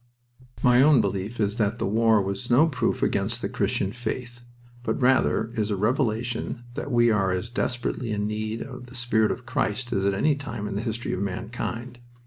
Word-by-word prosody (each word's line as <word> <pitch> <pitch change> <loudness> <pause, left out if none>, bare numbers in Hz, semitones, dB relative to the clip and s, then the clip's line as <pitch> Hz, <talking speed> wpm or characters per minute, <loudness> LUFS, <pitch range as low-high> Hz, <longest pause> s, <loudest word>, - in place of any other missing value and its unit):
My 125 0 +6
own 145 -1 +6
belief 100 +4 -2
is 105 +1 0
that 110 0 +1
the - - -1
war 110 +2 +4
was 100 +5 -4
no 125 +6 +6
proof 125 -6 0
against - - 0
the - - -2
Christian 95 - 0
faith, 120 +1 -5 0.4
but 120 - -2
rather 125 -3 +3
is 110 -3 -1
a 105 - 0
revelation 120 +2 -1
that 140 - -5
we 120 -1 +4
are 100 -3 +2
as 95 +6 -3
desperately 120 -1 -2
in 105 -1 -1
need 110 +1 -3
of 125 -2 -9
the 125 - -12
spirit 115 -3 +2
of 125 - -4
Christ 120 +3 -1
as 95 - 0
at 100 0 +2
any 145 +9 +2
time 120 -7 -5
in 105 - -4
the 100 - -2
history 115 0 -3
of 95 - -2
mankind. 120 +5 -4
115 Hz, 195 wpm, -25 LUFS, 105-125 Hz, 0.4 s, My